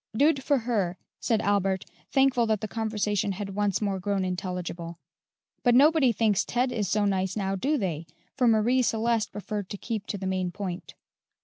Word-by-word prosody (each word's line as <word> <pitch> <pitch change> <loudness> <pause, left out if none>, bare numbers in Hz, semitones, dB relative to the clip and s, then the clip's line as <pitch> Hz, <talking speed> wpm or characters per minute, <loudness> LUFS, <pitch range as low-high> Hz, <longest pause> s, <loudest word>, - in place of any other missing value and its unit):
"Dood 285 0 +4
for 285 +1 +2
her," 210 -7 -1 0.2
said 225 -2 0
Albert, 195 -2 +1 0.3
thankful 265 -3 +3
that 220 -2 0
the 215 - -3
conversation 210 -2 -1
had 195 0 -5
once 205 0 0
more 195 -2 -1
grown 195 0 -1
intelligible. 180 -2 -4 0.6
"But 245 -2 +4
nobody 290 -1 +5
thinks 215 -2 +2
Ted 250 +1 0
is 210 -5 -1
so 210 -1 +2
nice 190 -2 0
now, 195 -2 -1
do 280 +11 0
they?" 170 - -3 0.3
for 250 -2 +2
Marie 230 +3 +3
Celeste 230 -2 0
preferred 205 -1 -5
to 205 - -5
keep 220 0 -4
to 205 - -3
the 190 - -6
main 185 -1 -1
point. 180 0 -6
205 Hz, 180 wpm, -27 LUFS, 190-235 Hz, 0.6 s, nobody